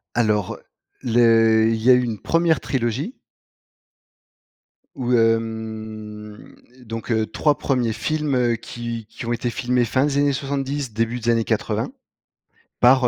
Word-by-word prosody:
Alors, 105 -5 +1 0.4
le 115 -2 +4
il 115 - +1
y 125 - +5
a - - +9
une 120 -4 0
1re 165 -1 +2
trilogie. 130 - -2 1.8
Ou 125 -1 -2
hem, 110 -2 -2 0.3
donc 115 +1 -6
heu, 110 -1 +1
3 145 +7 +1
premiers 125 -5 0
films 125 -2 0
qui 115 -1 -6
qui 115 - -8
ont 120 - -1
été 120 +1 -1
filmés, 125 +1 +1
fin 130 +5 +1
des 140 -1 -1
années 145 0 +3
70, 140 -2 -3
début 115 +2 -1
des 120 +1 +1
années 115 -1 +2
80, - - -1 0.9
par 125 0 +5
120 Hz, 135 wpm, -22 LUFS, 110-130 Hz, 1.8 s, a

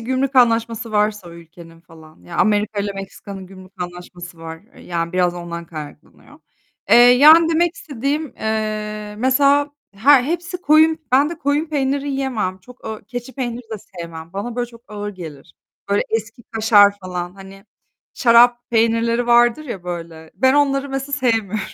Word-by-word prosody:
gümrük 260 +3 -2
anlaşması 230 -2 +2
varsa 210 -3 0
o - - -12
ülkenin 165 0 -15
falan. 160 -2 -18
Ya, 170 - -8
Amerika'yla 205 -1 0
Meksika'nın 195 0 -9
gümrük 185 0 -14
anlaşması 175 -1 -10
var. 165 0 -9
E, - - -17
yani, 170 -1 -4
biraz 180 -1 +1
ondan 170 -1 -7
kaynaklanıyor. 150 -1 -12 0.5
Eee, - - +8
yani, 290 +7 +7
demek 335 +2 +1
istediğim, 285 - -4
eee, 215 -1 -3
mesela 280 +3 +3 0.2
her 255 +6 +5
hepsi 345 +3 -4
koyun, 315 +1 +4
ben 280 +4 +4
de 335 - -7
koyun 290 +2 0
peyniri 280 -1 -1
yiyemem. 245 -9 -2
Çok 250 +7 -17
ağ 220 -1 -6
keçi 245 +2 -7
peyniri 245 -2 -4
de 220 - -3
sevmem. 170 -4 -10
Bana 230 +5 -5
böyle 245 0 -1
çok 230 -1 -16
ağır 205 -1 -5
gelir. 150 - -11 0.3
Böyle 200 - +2
eski 225 +2 -3
kaşar 215 -3 +4
falan. 180 -1 -5
Hani, 195 0 -13 0.5
şarap 240 0 +4
peynirleri 230 +1 +1
vardır 240 +4 +3
ya, 195 -10 -7
böyle, 165 -2 -7
ben 260 +1 +3
onları 280 -1 +1
mesela 270 +1 -5
sevmiyorum. 225 -6 0
225 Hz, 155 wpm, -19 LUFS, 185-265 Hz, 0.5 s, Eee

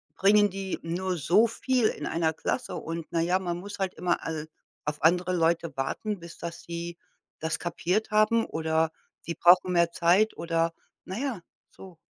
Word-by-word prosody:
bringen 205 +1 +5
die 195 0 -4
nur 180 +2 -2
so 195 +10 +4
viel 245 0 +1
in - - -4
1 165 -1 +1
Klasse. 245 +9 -3
Und, 165 0 -5
na 165 - +1
ja, 180 +3 +2
man 175 -2 -3
muss 200 +3 -8
halt 190 -1 -1
immer 175 -1 0
al 155 -1 -4 0.4
auf 150 0 -4
andere 180 +2 +3
Leute 165 -1 +1
warten, 200 +9 -2
bis 170 0 -11
das 170 0 -7
sie 170 0 -6 0.4
das 160 0 -2
kapiert 180 +5 -1
haben, 215 +2 +4
oder 160 0 0 0.3
sie 170 - -5
brauchen 180 +2 +5
mehr 170 -1 +3
Zeit 185 +5 +3
oder 165 0 0 0.3
na 190 +3 -6
ja, 260 -9 -3 0.3
so. 185 -3 -13
175 Hz, 175 wpm, -27 LUFS, 165-195 Hz, 0.4 s, bringen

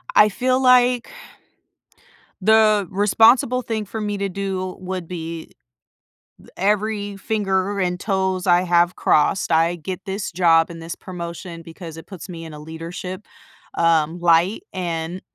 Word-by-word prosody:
I 210 0 +7
feel 255 +5 0
like 250 -1 +4 1.3
the 215 -1 +4
responsible 225 +5 +4
thing 220 -3 -3
for 220 +2 -6
me 205 -1 -2
to 200 0 -2
do 185 -1 -4
would 185 -2 -5
be 165 -2 -6 0.9
th - - -18
every 205 +1 -1
finger 195 -1 -1
and 180 -1 -1
toes 190 -2 -1
I 175 0 +4
have 175 0 +2
crossed, 155 +5 +2
I 165 +2 +3
get 185 +4 -6
this 195 0 -4
job 165 -2 +4
and 165 -1 -9
this 165 +1 -5
promotion, 170 -1 -8
because 165 0 -10
it 165 - -11
puts 190 -3 -10
me 165 -2 -8
in 160 - -9
a 150 - -9
leadership, 170 +5 -7 0.5
um, 165 0 +2
light, 175 - +3
and, 170 0 -4
185 Hz, 145 wpm, -21 LUFS, 170-205 Hz, 1.3 s, I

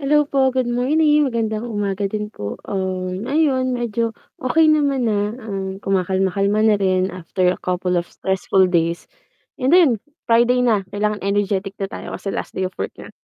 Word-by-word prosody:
Hello 295 +1 +3
po, 265 -2 +2
good 255 -2 0
morning, 295 +4 +3
magandang 225 -2 -2
umaga 205 -3 -2
din 210 +1 -4
po, 100 - -6 0.2
um, 185 +1 -3
ayon 265 -3 +1
medyo 230 -2 -2 0.2
okey 310 +5 +3
naman 285 -4 +2
na 205 +1 0
and 195 -2 -5
kumakalma-kalma 195 +2 +1
na 215 -2 +4
rin 185 -1 +1
after 180 +1 0
a - - -3
couple 180 0 -1
of 175 - -3
stressful 190 0 +1
days. 170 -1 0 0.5
And 265 +4 +3
'yun, 345 -8 +6 0.3
Friday 240 +2 +3
na 215 -6 +2
kailangan 210 0 0
energetic 200 0 -1
na 195 - -3
tayo - - -7
kasi 200 - -4
last - - -5
day 190 - -2
of 185 0 -4
work - - -4
na, - - -11
210 Hz, 170 wpm, -20 LUFS, 190-250 Hz, 0.5 s, yun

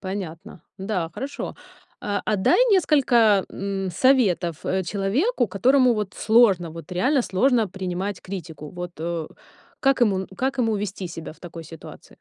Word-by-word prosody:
Понятно. 185 -1 -7 0.2
Да, 190 -4 -2
хорошо, 275 +2 -5 0.5
э. 205 -1 -2
А 215 - +1
дай 190 - +3
несколько, 240 - +4
м, 195 -1 -3
советов, 185 - +2
э, 190 0 0
человеку, 220 - 0
которому 250 +6 +3
вот 210 -3 -3
сложно, 205 -7 +3
вот 165 +2 -10
реально 255 +9 +2
сложно 230 +2 +2
принимать 190 +1 -4
критику. 165 -5 -8
Вот, 175 0 -7
э, 165 -1 -3 0.5
как 270 -2 +2
ему 195 -5 +2
как 265 +3 -1
ему 225 -3 +1
вести 200 -2 -4
себя 165 -2 -8
в - - -22
такой 170 -2 -9
ситуации? 165 0 -12
195 Hz, 145 wpm, -23 LUFS, 175-235 Hz, 0.5 s, несколько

